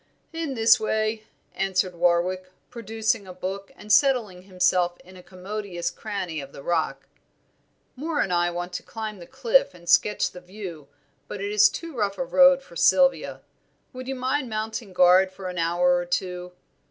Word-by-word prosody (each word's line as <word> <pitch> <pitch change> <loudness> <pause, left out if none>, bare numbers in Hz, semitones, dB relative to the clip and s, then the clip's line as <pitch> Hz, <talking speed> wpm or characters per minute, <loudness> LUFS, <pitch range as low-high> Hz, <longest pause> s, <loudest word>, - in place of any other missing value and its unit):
"In 325 -5 -3
this 225 -1 +5
way," 215 0 -1 0.3
answered 190 -1 0
Warwick, 180 +2 0 0.2
producing 225 -2 -2
a 185 - -8
book 195 +2 -5
and 210 0 -2
settling 235 -10 +3
himself 180 -2 +1
in 185 +1 -16
a 180 - -12
commodious 185 -1 -5
cranny 185 -6 -5
of 140 0 -11
the 140 - -11
rock. 155 -5 -1 0.9
"Moor 300 +3 -3
and 180 - 0
I 175 0 +2
want 175 +1 -5
to - - -4
climb 215 -3 -7
the 170 - -11
cliff 265 -6 +2
and 170 -1 -16
sketch 210 +4 +3
the 180 - -11
view; 180 -6 -9 0.4
but 205 - -6
it 200 +1 -3
is 210 0 +6
too 330 -3 -7
rough 205 -3 -1
a 265 - -2
road 270 0 +5
for - - -16
Sylvia. - - +3 0.5
Would 255 0 -8
you 270 - -3
mind 260 +1 -1
mounting 220 -1 -4
guard 185 +1 +5
for 190 -1 -7
an 180 -1 -5
hour 175 +2 +2
or 175 - -2
two? 180 0 -3
195 Hz, 175 wpm, -25 LUFS, 180-225 Hz, 0.9 s, is